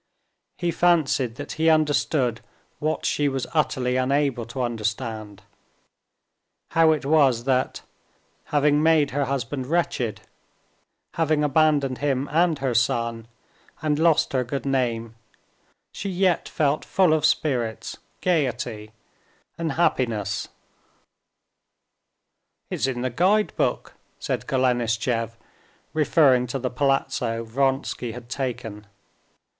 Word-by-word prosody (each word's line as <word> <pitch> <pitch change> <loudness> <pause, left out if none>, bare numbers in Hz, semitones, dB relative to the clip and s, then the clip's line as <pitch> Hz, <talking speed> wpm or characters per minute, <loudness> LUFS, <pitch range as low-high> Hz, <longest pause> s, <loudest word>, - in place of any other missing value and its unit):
He 175 -1 -1
fancied 150 -9 +2
that 145 - -7
he 160 +1 +2
understood 145 -6 +1 0.4
what 155 +1 -1
she 145 -1 +1
was 135 -2 -2
utterly 130 -5 +1
unable 135 -2 +1
to 125 +2 -3
understand: 110 -2 -4 1.3
how 165 -1 +5
it 150 -3 -1
was 140 -6 +3
that, 130 0 0 0.6
having 145 0 +2
made 155 -3 +3
her 140 +1 0
husband 130 -1 -3
wretched, 145 -8 -1 0.9
having 155 -2 +1
abandoned 145 -3 +2
him 140 -1 0
and 165 0 +3
her 135 -2 -1
son 115 0 0 0.6
and 150 -1 +1
lost 165 -3 +3
her 130 -1 +2
good 125 +2 -4
name, 120 -4 -1 0.8
she 200 - -5
yet 185 -1 +1
felt 150 -1 0
full 185 -5 +3
of 155 -2 +1
spirits, 125 -8 0 0.2
gaiety, 125 -10 -1 0.7
and 165 -3 -2
happiness. 115 - 0 2.2
"It's - - 0
in 125 -2 -3
the 130 - -1
guide 195 - +2
book," - - -1 0.2
said - - -3
Golenishtchev, 120 -3 0 0.6
referring 145 -5 +4
to 125 - -3
the 125 -1 -3
palazzo 125 -4 0
Vronsky 130 0 -1
had 120 0 -10
taken. 115 -6 -4
135 Hz, 110 wpm, -24 LUFS, 120-155 Hz, 2.2 s, how